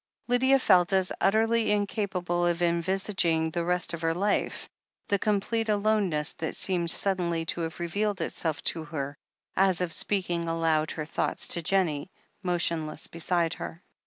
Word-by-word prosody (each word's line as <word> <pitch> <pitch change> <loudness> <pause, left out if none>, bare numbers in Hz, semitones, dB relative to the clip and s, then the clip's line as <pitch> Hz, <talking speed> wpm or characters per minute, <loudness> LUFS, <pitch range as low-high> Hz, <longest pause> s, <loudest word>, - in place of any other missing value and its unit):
Lydia 260 +2 +4
felt 185 -6 +4
as 190 -1 +2
utterly 225 +2 +3
incapable 195 -4 0
of 175 0 0
envisaging 170 -1 +1
the 170 +1 -1
rest 180 0 +1
of 170 - -5
her 165 0 0
life, 200 +3 0 0.4
the 200 - +2
complete 220 +2 0
aloneness 205 -7 +1
that 160 - -3
seemed 175 -3 +1
sud 195 +2 +2
denly 170 -2 -1
to 170 - -2
have 165 -1 -4
revealed 200 +4 -1
itself 165 -1 -2
to 165 - -1
her, 145 -2 -4 0.4
as 190 -2 +3
of 180 -2 -1
speaking 175 -4 0
aloud 165 -2 +1
her 155 - -4
thoughts 155 - -1
to 170 - +1
Jennie, 170 -3 0 0.3
motionless 170 -3 -1
beside 170 0 0
her. 165 - -8
175 Hz, 155 wpm, -28 LUFS, 165-200 Hz, 0.4 s, Lydia